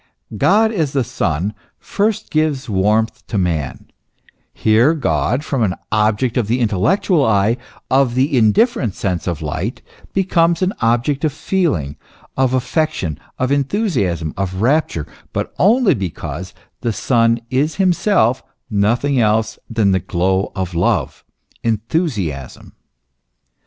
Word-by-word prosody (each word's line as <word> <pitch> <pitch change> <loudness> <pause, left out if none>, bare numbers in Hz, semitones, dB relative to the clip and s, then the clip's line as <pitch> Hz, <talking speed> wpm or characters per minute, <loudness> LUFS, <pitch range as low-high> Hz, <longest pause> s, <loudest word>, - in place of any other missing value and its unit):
God 215 - +3
as 160 -10 -1
the 135 -2 +1
Son 100 - -2 0.2
first 210 +1 -2
gives 155 -4 0
warmth 105 +2 0
to 105 - -2
man; 85 -7 -2 0.7
here 115 +9 +3
God, 120 - 0
from 135 -5 -1
an 95 -4 +1 0.2
object 110 +3 +1
of 120 -5 +1
the 120 +3 +1
intellectual 140 - +2
eye, 110 -1 +3 0.4
of 130 -2 +3
the 135 +3 +2
indifferent 115 - +2
sense 95 -3 -2
of 85 -3 -3
light, 75 - -4 0.3
becomes 170 -2 +2
an 185 +2 +1
object 120 +5 +1
of 155 - +2
feeling, 140 - -1 0.4
of 130 -1 +2
affection, 130 - -1 0.2
of 130 +1 -1
enthusiasm, 135 - 0
of 95 -1 -2
rapture; 130 - +1 0.3
but - - -3
only 220 0 +4
because 90 - -5 0.2
the 120 - -1
Son 115 0 +2
is 145 +5 +1
himself 180 - +2 0.3
nothing 120 +7 +1
else 110 0 +1
than 110 -4 +2
the 95 - +2
glow 95 +3 0
of 95 -2 -3
love, 85 - 0 0.4
enthusiasm. 110 - -2
115 Hz, 125 wpm, -18 LUFS, 95-150 Hz, 0.7 s, only